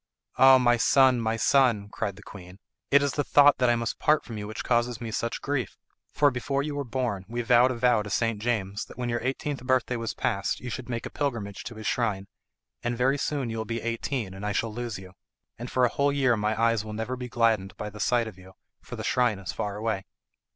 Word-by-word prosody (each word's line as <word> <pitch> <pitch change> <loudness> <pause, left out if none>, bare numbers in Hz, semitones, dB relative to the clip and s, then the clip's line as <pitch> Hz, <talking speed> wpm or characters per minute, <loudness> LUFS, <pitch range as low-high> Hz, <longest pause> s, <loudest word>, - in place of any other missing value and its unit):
"Ah, 135 0 +8
my 120 -1 +3
son, 130 0 +4
my 110 0 0
son," 120 -4 +3
cried 100 -1 -4
the 100 - -14
queen, 90 -1 -12 0.3
"it 140 0 +5
is 140 - +1
the 145 - -1
thought 145 +1 +5
that 125 -1 +3
I 120 - +4
must 115 -4 -3
part 150 0 +2
from 115 - -7
you 105 -1 -5
which 110 - -6
causes 120 -1 +1
me 115 -2 -5
such 115 +2 -3
grief; 140 -4 -2 0.3
for 145 -1 +3
before 135 +3 -2
you 150 0 -4
were 145 0 -2
born 120 -5 -2
we 120 +2 -3
vowed 120 +1 +5
a 130 - -2
vow 120 -2 +3
to 105 - -7
St. 115 +1 0
James 100 -4 -2
that - - -14
when 125 -1 -2
your 120 0 0
eighteenth 135 +2 -3
birthday 130 -1 +1
was 115 -1 -4
passed 100 0 -1
you 125 - -6
should 125 +2 -6
make 115 -1 -3
a - - -6
pilgrimage 115 -9 -3
to 115 - -7
his 110 0 -9
shrine, 105 -5 0 0.6
and 120 0 -2
very 135 +3 +2
soon 135 -6 -2
you 115 - -4
will - - -1
be 115 +1 -4
eighteen, 115 -2 -3
and 95 +2 -9
I 105 0 -1
shall 115 0 -1
lose 120 -1 -4
you. 95 -1 -12 0.5
And 120 +1 -6
for 130 -1 +3
a - - +2
whole 140 +3 +1
year 135 -4 +2
my 105 0 -1
eyes 115 -2 +2
will 110 0 -7
never 110 +4 -3
be 125 -1 -7
gladdened 115 -5 +1
by 105 0 -5
the 105 - -11
sight 115 +3 +1
of 100 -4 -10
you, 95 +1 -15 0.3
for - - -9
the - - -6
shrine 120 -5 +1
is 95 -1 -5
far 100 -1 -3
away." 105 -3 -2
115 Hz, 245 wpm, -27 LUFS, 105-130 Hz, 0.6 s, Ah